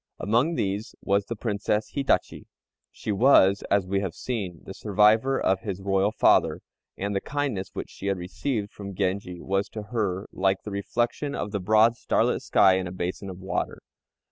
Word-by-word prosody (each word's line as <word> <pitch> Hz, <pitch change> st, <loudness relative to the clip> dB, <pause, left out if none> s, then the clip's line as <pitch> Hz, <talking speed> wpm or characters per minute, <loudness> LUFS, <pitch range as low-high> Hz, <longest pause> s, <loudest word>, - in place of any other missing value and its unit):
Among 120 Hz, -, +1 dB
these 100 Hz, -1 st, -2 dB
was 100 Hz, 0 st, +1 dB
the 115 Hz, -, -4 dB
Princess 105 Hz, -1 st, -1 dB
Hitachi. 140 Hz, -1 st, 0 dB, 0.4 s
She -, -, -5 dB
was, 100 Hz, -3 st, +5 dB
as 100 Hz, -2 st, +2 dB
we 95 Hz, +1 st, 0 dB
have 95 Hz, -4 st, -4 dB
seen, 100 Hz, -9 st, -4 dB
the 95 Hz, -, -8 dB
survivor 110 Hz, +6 st, +3 dB
of 95 Hz, 0 st, +2 dB
his 100 Hz, -4 st, -5 dB
Royal 95 Hz, +1 st, +2 dB
father, -, -, +3 dB, 0.4 s
and 100 Hz, +1 st, -2 dB
the 100 Hz, -, 0 dB
kindness 140 Hz, -10 st, -2 dB
which -, -, -5 dB
she -, -, -7 dB
had 100 Hz, -1 st, +1 dB
received 100 Hz, +4 st, -3 dB
from 100 Hz, -2 st, -8 dB
Genji 90 Hz, -1 st, -2 dB
was 100 Hz, +3 st, -1 dB
to 110 Hz, -, -6 dB
her 100 Hz, -4 st, -1 dB
like 95 Hz, 0 st, 0 dB
the 105 Hz, -, -6 dB
reflection 120 Hz, +8 st, -2 dB
of 105 Hz, -, -3 dB
the 100 Hz, -, -2 dB
broad 110 Hz, +4 st, +4 dB
starlit -, -, +1 dB
sky 95 Hz, -1 st, +4 dB
in 90 Hz, -, -3 dB
a -, -, -6 dB
basin 90 Hz, +2 st, -4 dB
of 90 Hz, -, -7 dB
water. 95 Hz, +1 st, -3 dB
100 Hz, 180 wpm, -26 LUFS, 95-110 Hz, 0.4 s, was